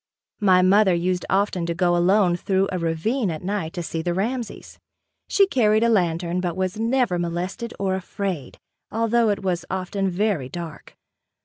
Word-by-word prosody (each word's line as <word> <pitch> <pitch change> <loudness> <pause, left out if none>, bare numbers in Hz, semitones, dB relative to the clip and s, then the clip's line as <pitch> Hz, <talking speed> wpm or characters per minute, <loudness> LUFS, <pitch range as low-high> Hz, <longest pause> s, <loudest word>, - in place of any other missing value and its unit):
My 185 -3 +4
mother 190 0 +5
used 180 +1 -1
often 190 -3 +1
to 170 - -2
go 175 0 +2
alone 180 +1 +3
through 190 +2 0
a 185 - -2
ravine 175 +8 0
at 160 -1 -5
night 190 -4 -2
to 175 -3 -4
see 165 0 -3
the 175 +1 -2
Ramsey's. 235 +5 -4 0.5
She 400 - +4
carried 225 - +2
a 235 - +3
lantern 175 -3 +1
but 175 -2 -3
was 185 +2 -2
never 230 -5 +1
molested 180 +7 -3
or 195 -1 0
afraid 190 -6 -4 0.3
although 230 +1 +2
it 200 -1 -1
was 180 -2 -1
often 190 +1 -2
very 180 -8 -1
dark. 170 -1 -8
185 Hz, 170 wpm, -23 LUFS, 175-210 Hz, 0.5 s, mother